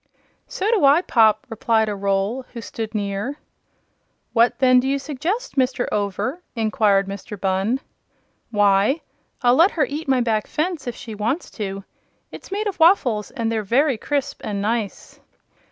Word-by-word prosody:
"So 385 - -3
do 440 -8 +2
I, 285 +5 +6
Pop," 220 -8 +3
replied 225 -1 +1
a 210 - -1
Roll 200 +4 -1
who 235 - -6
stood 220 0 -6
near. 205 +7 -2 1.0
"What, 235 +1 +3
then, 255 -1 +5
do 255 - -1
you 275 +1 +1
suggest, 315 - -4
Mr. 255 -1 +1
Over?" 210 - -2
inquired 215 -4 +2
Mr. 200 +1 -7
Bunn. 195 +7 0 0.7
"Why, 205 +6 +3 0.4
I'll 245 0 +5
let 335 +8 +6
her 300 - +4
eat 300 +2 -5
my 265 -1 +3
back 225 -3 0
fence, 315 -3 -2
if 240 - -3
she 225 - -8
wants 220 +10 -2
to. 195 -2 -5 0.5
It's - - -11
made 415 +2 -2
of 400 -4 -3
waffles, 270 - +3
and 230 -1 -2
they're 220 -1 0
very 250 +4 +2
crisp 285 +1 -2
and 205 -1 -3
nice." 215 0 -3
235 Hz, 160 wpm, -22 LUFS, 210-280 Hz, 1.0 s, I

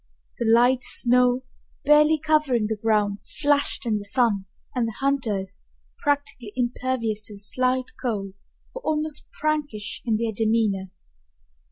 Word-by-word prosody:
The 225 -1 +2
light 245 +2 +4
snow, 250 +1 +3 0.4
barely 300 +2 +6
covering 300 -7 +2
the 220 +1 -1
ground, 210 -2 +1 0.2
flashed 290 -3 +1
in 220 -2 +1
the 205 - -6
sun, 205 -3 +1 0.3
and 245 -3 0
the 225 - -5
hunters, 220 -9 -1 0.4
practically 285 - -2
impervious 240 -3 -1
to 210 - -10
the - - -11
slight 255 +4 0
cold, 200 -6 -2 0.4
were - - -7
almost 310 -6 -2
prankish 290 -9 -2
in 225 -2 +1
their 225 +1 -1
demeanor. 215 -3 +1
240 Hz, 135 wpm, -24 LUFS, 215-280 Hz, 0.4 s, barely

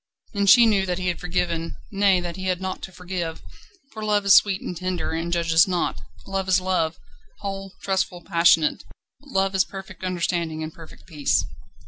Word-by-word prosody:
And 200 -1 +2
she 240 +2 +8
knew 200 -4 +2
that 180 -1 -1
he 185 -1 -1
had 175 - -3
forgiven 170 -2 -2 0.2
nay, 195 -2 +3
that 175 -1 -5
he 190 0 -6
had 185 -1 0
naught 190 0 -4
to 190 - -7
forgive 180 -3 -5 0.5
for 220 - -7
Love 210 -1 +1
is 200 - +7
sweet 195 -2 +4
and 180 - -6
tender, 185 -1 -3
and 165 +1 -3
judges 165 -1 +4
not. 180 -2 -1 0.2
Love 195 -1 -3
is 185 - +5
Love 180 -3 0 0.4
whole, 195 -1 -6
trustful, 190 -2 -1
passionate. 165 -2 +3 0.4
Love 195 -9 -1
is 190 -1 +4
perfect 190 -1 -10
understanding 170 -3 -2
and 155 0 -6
perfect 165 -3 -14
peace. 150 -5 0
185 Hz, 180 wpm, -24 LUFS, 170-195 Hz, 0.5 s, she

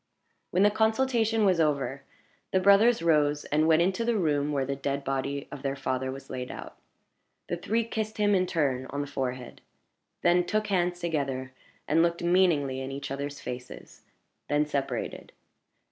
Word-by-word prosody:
When 185 +2 +2
the 205 - +5
consultation 225 0 +2
was 185 -3 +3
over, 140 -3 0 0.5
the 190 - +3
brothers 200 +2 +5
rose 150 -3 +2
and 155 +2 +2
went 165 +1 +5
into 190 +5 0
the 235 -1 +1
room 150 -5 +1
where 140 -2 0
the 140 +1 -2
dead 140 0 -3
body 135 +1 -2
of 140 - -7
their 135 0 -2
father 130 -1 -2
was 135 0 -9
laid 125 -1 -5
out. - - -8 0.7
The - - 0
three 220 +7 0
kissed 220 -1 -4
him, 205 -1 +3
in 185 -1 +2
turn, 135 -6 0
on 140 +1 -3
the - - -2
forehead 130 -3 -5 0.6
then 175 +1 +4
took 215 +4 -1
hands 180 -3 0
together, 135 -6 -2 0.4
and 160 +3 +3
looked 170 0 +1
meaningly 170 -7 +2
in 135 +1 -5
each 140 0 -6
other's 140 +1 -4
faces 125 0 -8 0.5
then 145 +1 +2
separated. 140 -2 -4
150 Hz, 170 wpm, -28 LUFS, 135-190 Hz, 0.7 s, the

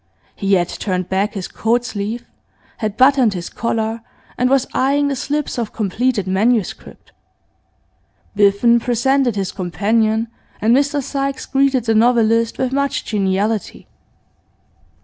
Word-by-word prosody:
He 195 0 0
had 175 -2 +1
turned 185 -2 -3
back 195 +3 -1
his 190 -3 -4
coat 235 +2 0
sleeve, 215 +2 -4 0.5
had 215 -2 -3
buttoned 260 -5 +4
his 175 -1 -5
collar, 225 -1 -2 0.3
and 250 0 +1
was 270 -1 +3
eyeing 285 +2 +1
the 275 - -1
slips 290 0 -3
of 230 -3 -4
completed 220 +1 -1
manuscript. 205 +3 -1 1.2
Biffen 205 +4 +4
presented 245 +1 +1
his 195 -2 -2
companion, 215 +5 0 0.3
and 225 +3 +3
Mr 285 +1 +1
Sykes 275 0 -3
greeted 270 -3 +1
the 225 - +2
novelist 230 0 +3
with 260 0 -1
much 280 0 -1
geniality. 205 +1 -1
230 Hz, 130 wpm, -18 LUFS, 205-260 Hz, 1.2 s, buttoned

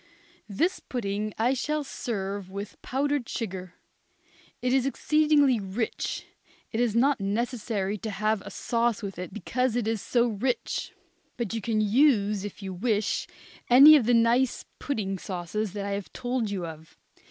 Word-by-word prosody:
This 325 - 0
pudding 215 -3 -3
I 240 +4 +2
shall 300 +3 -1
serve 200 -7 -4
with 200 +1 -7
powdered 280 -1 -1
sugar. 185 -5 -5 0.8
It 250 0 0
is 265 0 +3
exceedingly 295 -3 +3
rich. 200 +3 -3 0.5
It 225 - -2
is 240 -3 +1
not 270 +2 +3
necessary 210 -1 -2
to 220 - -4
have 215 +1 0
a - - -9
sauce 235 -2 0
with 195 -3 -5
it 180 -2 -5
because 250 +2 -1
it 240 -3 0
is 225 -2 -1
so 240 -1 +2
rich. 235 +4 -2 0.5
But 235 -4 -3
you 225 - -2
can 215 +1 0
use, 210 -3 +3
if 205 0 -7
you 190 -1 -4
wish, 210 +2 0 0.4
any 275 +5 +10
of 255 -7 +3
the 245 - +5
nice 235 +2 +2
pudding 195 -9 -2
sauces 190 +3 -3
that 200 -1 -4
I 200 - -3
have 200 -1 -4
told 245 -3 -2
you 190 -4 -3
of. 160 -1 -10
220 Hz, 160 wpm, -27 LUFS, 200-250 Hz, 0.8 s, any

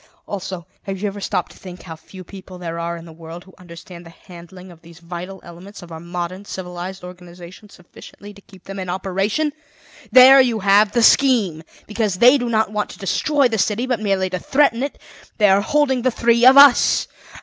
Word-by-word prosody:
"Also, 185 -3 -7 0.2
have 195 -1 -7
you 210 - -3
ever 200 0 -7
stopped - - -3
to - - -18
think 180 -1 -12
how 165 -3 -9
few 185 +3 -14
people 185 0 -13
there 170 -1 -6
are 170 0 -4
in 165 - -12
the 165 - -13
world 165 +2 -11
who 190 - -20
understand 175 0 -13
the 165 - -14
handling 180 +2 -15
of 165 -1 -18
these 170 0 -17
vital 175 +2 -9
elements 180 +3 -13
of 175 - -14
our 160 - -8
modern 175 +2 -6
civilized 185 -1 -8
organization 180 +2 -13
sufficiently 205 +3 -15
to 200 - -18
keep 190 -2 -19
them 195 0 -9
in 185 -1 -6
operation? 195 - -2 0.6
There 265 +1 +8
you 235 -4 -1
have 205 +1 +3
the 235 - +1
scheme. 225 - +3 0.2
Because 210 -2 -2
they 250 +8 +5
do 245 -1 -3
not 220 -2 0
want 210 -1 -3
to - - -12
destroy 275 +7 0
the 225 -3 -3
city, 215 +5 -1
but 250 -4 -2
merely 195 -3 -1
to 185 - -3
threaten 265 - +1
it, 280 +1 -4 0.4
they 210 -2 +3
are 195 +1 +3
holding 265 +2 0
the 255 - +1
three 235 0 +2
of 265 +1 +6
us. 280 -2 +5
195 Hz, 205 wpm, -19 LUFS, 175-225 Hz, 0.6 s, There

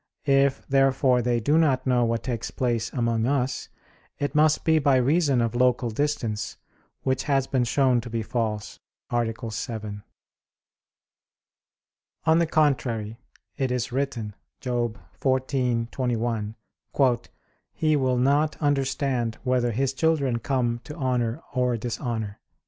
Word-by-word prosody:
If, 135 -1 +3
therefore, 135 -2 +3
they 120 0 +1
do 145 +8 +3
not 135 -5 +2
know 125 -2 +3
what 115 0 -1
takes 120 -3 -3
place 115 -2 -1
among 115 -2 0
us, 135 -1 -1 0.5
it 145 -1 -2
must 155 0 +3
be 160 -1 +4
by 140 -2 +3
reason 140 0 +3
of 115 -2 0
local 125 -1 +2
distance; 120 -5 -2 0.5
which 130 0 0
has 135 -3 +2
been 130 -2 0
shown 130 -1 +2
to 120 - -8
be 115 -1 -2
false 110 -2 -3 0.3
(A. 120 0 +2 0.3
7). 105 -2 -5 2.2
On 160 +1 +5
the 170 - +2
contrary, 125 -8 0 0.4
It 135 -2 0
is 125 -1 -1
written 125 -5 -2 0.3
(Job 120 -3 -2 0.2
14:21): 120 -4 0 1.2
"He 155 -1 +1
will 130 -3 +1
not 145 +4 +2
understand 135 -5 0
whether 125 -1 +1
his 130 +4 0
children 140 -5 +1
come 120 -2 -1
to 150 - -8
honor 125 -2 -1
or 125 -2 +1
dishonor." 115 -3 -4
125 Hz, 125 wpm, -25 LUFS, 115-140 Hz, 2.2 s, On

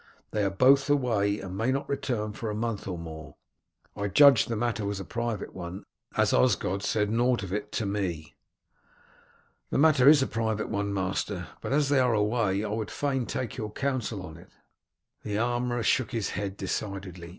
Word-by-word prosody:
They 105 - 0
are 100 - +2
both 135 +9 +4
away 110 -8 +2
and 95 -1 -7
may 115 +6 +1
not 135 +1 -2
return 120 -7 -2
for 110 +1 -5
a 105 - -3
month 115 -1 -3
or 90 -2 -3
more. 80 -2 -9 0.6
I 100 - -2
judged 140 +7 +6
the 115 - -1
matter 115 -1 -1
was 100 -1 -2
a 95 - -6
private 115 -3 -3
one, 90 +1 -7 0.3
as - - +3
Osgod 90 +9 +2
said 105 0 0
nought 120 0 +2
of 95 -1 -5
it 105 - -3
to 110 - -1
me." 95 -6 -3 1.4
"The - - -1
matter 140 -3 +6
is 145 -3 +6
a - - +1
private 110 -3 -2
one, 100 -1 -1
master, 95 -1 -2
but - - -4
as 145 0 +2
they 140 -2 +4
are 125 -3 +3
away 105 -2 +1
I - - -3
would 110 0 -3
fain 135 -4 -1
take 120 -4 -4
your 110 -3 -4
counsel 120 -7 -2
on 80 -1 -10
it." 85 - -16 0.7
The 105 -1 -3
armourer 120 +1 0
shook 130 +2 +2
his 115 -4 -1
head 100 +1 -4
decidedly. 95 -4 -4
105 Hz, 190 wpm, -28 LUFS, 100-125 Hz, 1.4 s, judged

